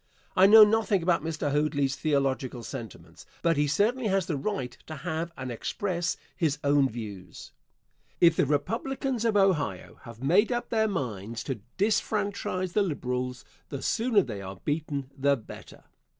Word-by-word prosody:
I 190 Hz, +1 st, +7 dB
know 220 Hz, +1 st, +10 dB
nothing 210 Hz, -3 st, +2 dB
about 170 Hz, -3 st, +2 dB
Mr. 155 Hz, -3 st, -2 dB
Hoadly's 145 Hz, -2 st, +1 dB
theological 135 Hz, -4 st, -1 dB
sentiments, 115 Hz, -3 st, -9 dB, 0.2 s
but 165 Hz, -1 st, +3 dB
he 145 Hz, 0 st, +2 dB
certainly 225 Hz, -, +1 dB
has 195 Hz, -2 st, +1 dB
the 160 Hz, -, -2 dB
right 135 Hz, -5 st, -3 dB
to 155 Hz, -, -6 dB
have 160 Hz, +2 st, -3 dB
and 130 Hz, -1 st, -5 dB
express 170 Hz, -, -2 dB, 0.2 s
his 160 Hz, -5 st, 0 dB
own 140 Hz, -1 st, +3 dB
views. 100 Hz, -7 st, -8 dB, 0.7 s
If 170 Hz, -2 st, +6 dB
the 145 Hz, -, +2 dB
Republicans 235 Hz, -, -1 dB
of 220 Hz, -2 st, +3 dB
Ohio 190 Hz, -7 st, +1 dB
have 115 Hz, +1 st, -10 dB
made 190 Hz, -, +4 dB
up 240 Hz, 0 st, -2 dB
their 220 Hz, -1 st, +2 dB
minds 115 Hz, -, -4 dB
to 130 Hz, -3 st, -4 dB, 0.2 s
disfranchise 200 Hz, -3 st, 0 dB
the 210 Hz, -, +3 dB
Liberals, 125 Hz, -7 st, -3 dB, 0.2 s
the 140 Hz, -2 st, -5 dB
sooner 225 Hz, -3 st, +2 dB
they 105 Hz, -8 st, -6 dB
are 95 Hz, 0 st, -7 dB
beaten 145 Hz, -3 st, -2 dB
the 140 Hz, 0 st, +2 dB
better. 110 Hz, -, -12 dB
155 Hz, 155 wpm, -28 LUFS, 135-200 Hz, 0.7 s, know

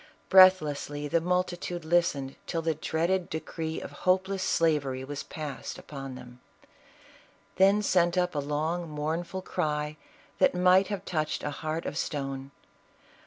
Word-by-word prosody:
Breathlessly 150 Hz, -6 st, +5 dB
the 165 Hz, +3 st, +1 dB
multitude 175 Hz, -1 st, -1 dB
listened 160 Hz, -5 st, +1 dB
till 165 Hz, -1 st, -2 dB
the 165 Hz, 0 st, +1 dB
dreaded 170 Hz, +4 st, -1 dB
decree 160 Hz, 0 st, -4 dB
of -, -, -8 dB
hopeless 190 Hz, +1 st, 0 dB
slavery 145 Hz, -7 st, +1 dB
was 145 Hz, +1 st, -5 dB
passed 150 Hz, -4 st, -6 dB
upon 135 Hz, -2 st, -8 dB
them; 125 Hz, -1 st, -12 dB, 1.2 s
then 195 Hz, +2 st, +5 dB
sent 175 Hz, -2 st, +2 dB
up 180 Hz, 0 st, +1 dB
a 150 Hz, -, -1 dB
long, 155 Hz, +4 st, -2 dB
mournful 165 Hz, +5 st, -3 dB
cry 150 Hz, -4 st, -2 dB, 0.4 s
tl\at -, -, +4 dB
might 185 Hz, +1 st, +5 dB
have 200 Hz, -2 st, -4 dB
touched 155 Hz, -3 st, -2 dB
a 150 Hz, -, -2 dB
heart 155 Hz, +3 st, -4 dB
of 150 Hz, -, -3 dB
stone. 135 Hz, -2 st, -3 dB
160 Hz, 135 wpm, -28 LUFS, 145-180 Hz, 1.2 s, Breathlessly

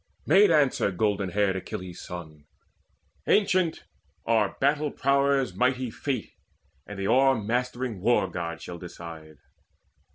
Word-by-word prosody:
Made 195 Hz, +6 st, +6 dB
answer 145 Hz, -9 st, +3 dB
golden 100 Hz, 0 st, 0 dB
haired 100 Hz, 0 st, +1 dB
Achilles' 90 Hz, -1 st, -7 dB
son: 80 Hz, -4 st, -9 dB, 0.8 s
"Ancient, 185 Hz, -5 st, +2 dB, 0.4 s
our 110 Hz, -3 st, +1 dB
battle 145 Hz, +2 st, +2 dB
prowess 140 Hz, -1 st, +1 dB
mighty 125 Hz, -1 st, 0 dB
Fate 130 Hz, -4 st, -4 dB, 0.6 s
And 105 Hz, -, -8 dB
the 100 Hz, -, -3 dB
o'ermastering 125 Hz, -1 st, +1 dB
War 110 Hz, 0 st, +2 dB
god 85 Hz, -1 st, -5 dB
shall 85 Hz, -1 st, -7 dB
decide." 80 Hz, -3 st, -10 dB
115 Hz, 110 wpm, -26 LUFS, 90-135 Hz, 0.8 s, Made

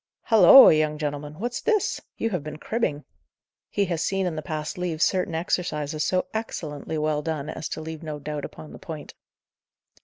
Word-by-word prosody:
"Halloa, 225 Hz, +2 st, +9 dB
young 155 Hz, -1 st, +1 dB
gentleman! 150 Hz, 0 st, -4 dB
what's 240 Hz, +5 st, -3 dB
this! 430 Hz, -3 st, +1 dB, 0.2 s
You 225 Hz, -, -1 dB
have 180 Hz, -7 st, -2 dB
been 150 Hz, 0 st, -7 dB
cribbing." 155 Hz, -7 st, -2 dB, 0.7 s
He 200 Hz, -, +1 dB
had 170 Hz, -3 st, -2 dB
seen 195 Hz, +3 st, 0 dB
in 175 Hz, -3 st, -2 dB
the 155 Hz, -, -3 dB
past 155 Hz, 0 st, -4 dB
leaves 175 Hz, -3 st, -1 dB
certain 185 Hz, -4 st, +1 dB
exercises 155 Hz, -3 st, -1 dB
so 185 Hz, 0 st, +1 dB
excellently 160 Hz, -8 st, -4 dB
well 150 Hz, -1 st, 0 dB
done 155 Hz, -2 st, -3 dB
as 155 Hz, -, -5 dB
to -, -, -5 dB
leave 160 Hz, 0 st, -7 dB
no 155 Hz, -2 st, -5 dB
doubt 150 Hz, 0 st, -5 dB
upon 155 Hz, -, -9 dB
the -, -, -10 dB
point. 155 Hz, -3 st, -8 dB
155 Hz, 180 wpm, -25 LUFS, 150-185 Hz, 0.7 s, Halloa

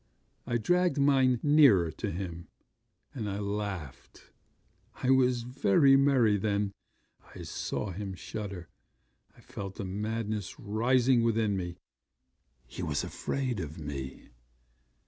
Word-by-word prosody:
I 120 Hz, -1 st, +1 dB
dragged 175 Hz, +5 st, +2 dB
mine 135 Hz, -3 st, +4 dB
nearer 135 Hz, -, +5 dB
to -, -, -4 dB
him; 85 Hz, -1 st, -6 dB, 0.7 s
and 110 Hz, -5 st, -4 dB
I 100 Hz, -, -3 dB
laughed 100 Hz, -8 st, -5 dB, 0.6 s
I 130 Hz, -, 0 dB
was 125 Hz, -2 st, +3 dB
very 125 Hz, +2 st, +4 dB
merry 130 Hz, -6 st, +4 dB
then 100 Hz, 0 st, 0 dB, 0.6 s
I -, -, -8 dB
saw 100 Hz, -, -4 dB
him 95 Hz, +1 st, -5 dB
shudder. 100 Hz, -2 st, -6 dB, 0.7 s
I -, -, -17 dB
felt 100 Hz, -1 st, -7 dB
the 100 Hz, -, -5 dB
madness 105 Hz, 0 st, -3 dB
rising 120 Hz, +4 st, +2 dB
within 110 Hz, -3 st, +1 dB
me. 90 Hz, -2 st, -4 dB, 0.9 s
He -, -, -8 dB
was -, -, -1 dB
afraid 130 Hz, -5 st, -3 dB
of 80 Hz, -2 st, -6 dB
me. 70 Hz, -4 st, -7 dB
105 Hz, 120 wpm, -30 LUFS, 95-125 Hz, 0.9 s, nearer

